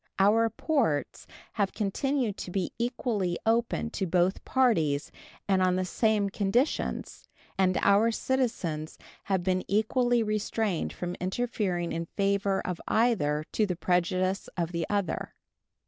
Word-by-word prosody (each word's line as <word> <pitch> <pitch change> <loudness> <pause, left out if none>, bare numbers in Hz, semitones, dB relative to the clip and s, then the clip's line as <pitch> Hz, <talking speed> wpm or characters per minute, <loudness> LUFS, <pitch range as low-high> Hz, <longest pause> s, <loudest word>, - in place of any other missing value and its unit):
Our 220 +4 +4
ports 225 - -1 0.3
have 200 -2 0
continued 235 +2 0
to - - -6
be 180 -1 -2
equally 230 -7 -1
open 230 0 +1
to 195 -4 -2
both 180 +2 +1
parties 165 - +1 0.4
and 190 -2 +3
on 185 -1 +3
the 185 0 0
same 210 +1 +1
conditions, 210 +9 -1 0.3
and 185 -1 +2
our 205 +3 +5
citizens 220 -11 -2 0.3
have 190 -3 0
been 185 0 +1
equally 235 +3 +2
restrained 215 -3 -1
from 175 0 -4
interfering 185 -3 -1
in 165 +1 -3
favor 200 -1 +1
of 180 -2 -3
either 170 -11 +2
to 215 - +1
the 180 - -2
prejudice 185 +2 0
of 170 -1 -1
the 170 -2 -2
other. 200 -5 -2
195 Hz, 130 wpm, -28 LUFS, 180-225 Hz, 0.4 s, our